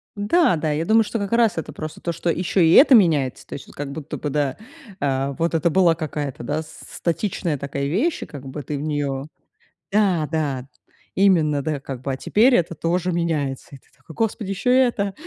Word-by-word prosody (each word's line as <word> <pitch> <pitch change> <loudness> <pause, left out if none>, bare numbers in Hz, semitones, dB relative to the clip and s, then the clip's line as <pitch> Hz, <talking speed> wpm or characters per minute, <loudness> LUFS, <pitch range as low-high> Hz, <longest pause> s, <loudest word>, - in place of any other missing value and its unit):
Да, 205 - +2
да, 155 0 -1
я 155 +2 -1
думаю, 225 +1 +4
что 225 +1 -4
как 200 +1 -4
раз 230 -5 +3
это 160 - -4
просто 155 -1 -7
то, 170 - -2
что 170 +1 -3
ещё 180 +3 0
и 165 -1 +5
это 270 - +8
меняется. 150 - +2
То - - -9
есть 140 - -8
вот - - -16
как 140 -1 -5
будто 155 0 -6
бы 150 - -4
да, 145 -1 -1 0.4
э, 135 0 -1
вот 165 +1 0
это 165 +2 +2
была 170 -1 +4
какая-то, 145 -5 -5
да, 150 +5 -2
статичная 170 +1 -3
такая 140 0 -3
вещь, 250 - 0
и - - -6
как 140 -2 -10
бы 145 +3 -6
ты 145 +2 -4
в - - -5
неё 145 -3 -2 0.7
Да, 190 -7 +2
да, 140 -5 -2 0.5
именно, 160 -7 +3
да, 150 -1 -2
как 135 -2 -7
бы, 135 - -3
а 130 - -3
теперь 235 - +3
это 170 -1 0
тоже 175 +3 -1
меняется. 155 -6 -2
И 140 - -10
ты - - -28
такой: 135 +5 -14
"Господи, 220 -2 -2
ещё 220 +6 0
и - - +5
это. 225 -6 +1
160 Hz, 215 wpm, -22 LUFS, 140-195 Hz, 0.7 s, это